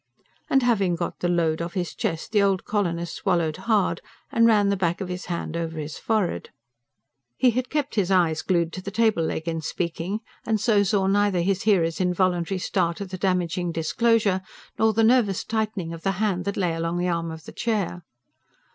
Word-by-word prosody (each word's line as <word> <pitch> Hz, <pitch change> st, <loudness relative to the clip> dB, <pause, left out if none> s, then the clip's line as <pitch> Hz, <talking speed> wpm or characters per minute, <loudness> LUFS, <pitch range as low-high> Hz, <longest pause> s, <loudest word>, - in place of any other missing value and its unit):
And 270 Hz, -1 st, +3 dB
having 200 Hz, -7 st, +2 dB
got 170 Hz, +1 st, -4 dB
the 175 Hz, -, 0 dB
load 170 Hz, -2 st, +1 dB
off 170 Hz, +2 st, -5 dB
his 180 Hz, -3 st, -2 dB
chest, 165 Hz, +5 st, -3 dB
the 210 Hz, -2 st, +4 dB
old 195 Hz, -2 st, +1 dB
colonist 175 Hz, -5 st, -1 dB
swallowed 170 Hz, -5 st, 0 dB
hard, 205 Hz, -7 st, +1 dB, 0.3 s
and 230 Hz, 0 st, +4 dB
ran 205 Hz, -3 st, +4 dB
the 200 Hz, -, +2 dB
back 175 Hz, -3 st, 0 dB
of 190 Hz, -2 st, -4 dB
his 180 Hz, 0 st, -5 dB
hand 170 Hz, -2 st, -4 dB
over 165 Hz, -1 st, -3 dB
his 150 Hz, 0 st, -5 dB
forehead. 215 Hz, -6 st, -1 dB, 0.9 s
He 255 Hz, -, +4 dB
had 250 Hz, +2 st, -2 dB
kept 295 Hz, -1 st, -1 dB
his 195 Hz, -4 st, +1 dB
eyes 170 Hz, -4 st, +3 dB
glued 170 Hz, -2 st, 0 dB
to 185 Hz, -, -5 dB
the 195 Hz, -, -5 dB
table 220 Hz, -3 st, +2 dB
leg 160 Hz, 0 st, -2 dB
in 165 Hz, -1 st, -2 dB
speaking, 170 Hz, +5 st, -3 dB, 0.2 s
and 220 Hz, -1 st, 0 dB
so 210 Hz, -1 st, +3 dB
saw 195 Hz, 0 st, +1 dB
neither 200 Hz, -2 st, +2 dB
his 195 Hz, +2 st, 0 dB
hearer's 165 Hz, -4 st, +2 dB
involuntary 180 Hz, 0 st, +1 dB
start 170 Hz, -2 st, -1 dB
at 195 Hz, -2 st, -6 dB
the 185 Hz, -, -4 dB
damaging 180 Hz, -2 st, 0 dB
disclosure, 200 Hz, +4 st, +2 dB, 0.4 s
nor 220 Hz, 0 st, +4 dB
the 225 Hz, +1 st, +2 dB
nervous 220 Hz, -5 st, +3 dB
tightening 215 Hz, -6 st, -2 dB
of 165 Hz, -, -8 dB
the 195 Hz, +2 st, 0 dB
hand 190 Hz, -2 st, -1 dB
that 200 Hz, -, -2 dB
lay 180 Hz, -4 st, +1 dB
along 165 Hz, +1 st, -2 dB
the 180 Hz, +1 st, 0 dB
arm 170 Hz, -1 st, -1 dB
of 160 Hz, -1 st, -8 dB
the -, -, -10 dB
chair. 205 Hz, -6 st, -1 dB
185 Hz, 200 wpm, -24 LUFS, 170-210 Hz, 0.9 s, the